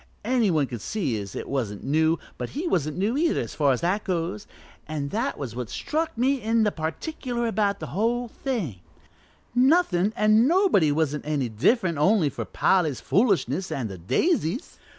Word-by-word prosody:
Any 240 Hz, -3 st, +2 dB
one 155 Hz, -5 st, +2 dB
could 120 Hz, -5 st, -7 dB
see 155 Hz, -, -2 dB
as 100 Hz, -1 st, -8 dB
it -, -, -5 dB
wasn't 115 Hz, -7 st, -3 dB
new, 160 Hz, +3 st, +2 dB, 0.2 s
but -, -, -3 dB
he 325 Hz, -, -2 dB
wasn't 155 Hz, -, 0 dB
new 205 Hz, +6 st, 0 dB
either, 325 Hz, +3 st, +1 dB
as -, -, -6 dB
far 145 Hz, -3 st, +2 dB
as 125 Hz, -, 0 dB
that 185 Hz, +5 st, 0 dB
goes, 165 Hz, -, -3 dB, 0.4 s
an' 145 Hz, -2 st, -3 dB
that -, -, -2 dB
was 125 Hz, -5 st, -6 dB
what 125 Hz, -2 st, -4 dB
struck 315 Hz, -, -2 dB
me 260 Hz, +2 st, +1 dB
in 225 Hz, +1 st, +2 dB
particular 240 Hz, -, -3 dB
about 210 Hz, -3 st, 0 dB
the -, -, -5 dB
whole 235 Hz, +5 st, 0 dB
thing 220 Hz, -, -4 dB, 0.7 s
nothin' 245 Hz, -, +3 dB
an' 215 Hz, +3 st, +4 dB
nobody 335 Hz, -, +4 dB
wasn't 150 Hz, -1 st, -1 dB
any 140 Hz, -5 st, 0 dB
different 170 Hz, -, +1 dB
only 170 Hz, -2 st, +3 dB
for -, -, -5 dB
Polly's 160 Hz, -8 st, +1 dB
foolishness 195 Hz, -3 st, +1 dB
and 120 Hz, -5 st, -2 dB
the 95 Hz, -, -8 dB
daisies. 220 Hz, -, 0 dB
185 Hz, 170 wpm, -25 LUFS, 145-235 Hz, 0.7 s, an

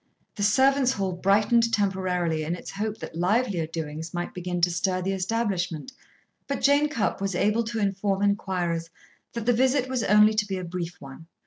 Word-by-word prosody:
The 205 Hz, -, -6 dB
servants' 265 Hz, +5 st, +3 dB
hall 195 Hz, -4 st, -2 dB
brightened 210 Hz, +6 st, +2 dB
temporarily 185 Hz, -6 st, 0 dB
in 165 Hz, +3 st, -2 dB
its -, -, -9 dB
hope 210 Hz, +2 st, -3 dB
that -, -, -8 dB
livelier 180 Hz, -1 st, +1 dB
doings 160 Hz, +1 st, -6 dB
might 175 Hz, 0 st, -3 dB
begin 180 Hz, 0 st, -3 dB
to 175 Hz, +1 st, +3 dB
stir 185 Hz, +2 st, 0 dB
the 190 Hz, -, -1 dB
establishment, 190 Hz, -, -2 dB, 0.6 s
but 280 Hz, -, -3 dB
Jane 285 Hz, +2 st, +4 dB
Cupp 230 Hz, -8 st, -1 dB
was 195 Hz, -2 st, -1 dB
able 210 Hz, +5 st, +2 dB
to 230 Hz, +1 st, -4 dB
inform 200 Hz, -1 st, 0 dB
inquirers 180 Hz, -5 st, -1 dB, 0.4 s
that 235 Hz, -2 st, -4 dB
the 245 Hz, -, +4 dB
visit 260 Hz, +2 st, +2 dB
was 255 Hz, -2 st, -1 dB
only 210 Hz, +1 st, +5 dB
to 215 Hz, -1 st, 0 dB
be 195 Hz, -1 st, -3 dB
a 185 Hz, -, -5 dB
brief 175 Hz, 0 st, -5 dB
one. 140 Hz, +4 st, -11 dB
195 Hz, 185 wpm, -26 LUFS, 175-225 Hz, 0.6 s, only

